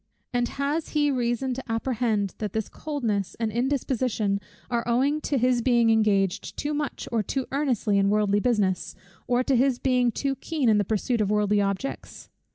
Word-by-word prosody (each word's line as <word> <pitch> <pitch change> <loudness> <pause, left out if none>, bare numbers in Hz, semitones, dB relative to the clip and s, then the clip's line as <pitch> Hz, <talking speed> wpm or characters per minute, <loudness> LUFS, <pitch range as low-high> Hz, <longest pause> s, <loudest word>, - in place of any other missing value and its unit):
And 245 0 +1
has 285 +5 -2
he 290 -1 +3
reason 250 0 0
to 255 -2 -6
apprehend 225 -4 0
that 210 -3 -3
this 220 -2 -2
coldness 230 - -3
and 225 -2 -1
indisposition 240 -4 0 0.3
are 235 -1 -1
owing 275 +6 +2
to 285 - -1
his 250 0 +2
being 235 -2 +3
engaged 200 -4 +1
too 295 +1 -2
much 295 -2 -3
or 230 -2 +1
too 260 +6 -2
earnestly 250 -8 +1
in 195 0 +3
worldly 205 -1 +2
business, 205 -6 0 0.3
or 250 0 +2
to 270 - +1
his 255 0 +3
being 250 -2 +2
too 275 +4 -1
keen 300 -7 0
in 210 -1 +4
the - - +2
pursuit 220 +3 0
of 205 - +1
worldly 210 0 +2
objects? 200 +7 -4
240 Hz, 175 wpm, -26 LUFS, 210-265 Hz, 0.3 s, in